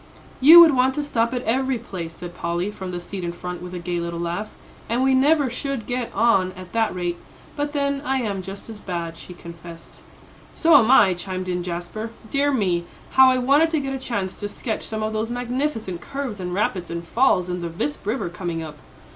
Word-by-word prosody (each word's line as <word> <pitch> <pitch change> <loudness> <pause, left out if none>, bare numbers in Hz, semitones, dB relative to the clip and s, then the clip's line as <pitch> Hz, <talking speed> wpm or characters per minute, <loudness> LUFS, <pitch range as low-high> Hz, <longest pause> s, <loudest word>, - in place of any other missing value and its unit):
"You 315 +6 +10
would 325 -3 +7
want 260 0 +2
to 295 - -1
stop 235 -5 0
at 250 -1 -3
every 260 +2 +1
place," 175 -8 -7
said 175 +1 -8
Polly, 175 +3 -2
from 190 -3 -7
the 175 -1 -4
seat 185 +2 -7
in 170 - -2
front, 180 +1 -6
with 180 0 -7
a - - -3
gay 175 0 -3
little 170 0 -4
laugh. 175 +5 -3 0.4
"And 240 +3 +1
we 265 0 +4
never 285 +2 +4
should 250 -1 -4
get 245 -1 -3
on 195 -4 +3
at 185 -1 -11
that 225 -4 +1
rate. 175 -1 -2 0.4
But 290 0 -2
then 280 -1 0
I 270 -1 0
am 200 -3 -2
just 195 +2 -8
as 220 -2 -8
bad," 170 -3 -4
she 180 - -11
confessed. 170 0 -11 0.6
"So 325 -1 +5
am 240 -5 +6
I," 205 -8 +6
chimed 185 +1 -5
in 180 -1 -1
Jasper. 175 +5 -5 0.2
"Dear 285 +1 +2
me, 185 -9 0 0.3
how 265 0 +7
I 255 - +3
wanted 280 +6 +4
to 320 -2 0
get 270 -1 -3
a 270 - -3
chance 200 -7 -3
to 205 - -4
sketch 220 +1 -4
some 220 0 -3
of 215 0 -2
those 220 +1 -1
magnificent 245 - -2
curves 275 -7 -5
and 180 -1 -4
rapids 185 -2 -1
and 170 0 -5
falls 190 -4 +3
in 180 0 -3
the 170 - -3
Visp 150 -2 -3
River 215 0 -2
coming 170 -2 -4
up." 155 -1 -9
205 Hz, 220 wpm, -23 LUFS, 175-260 Hz, 0.6 s, You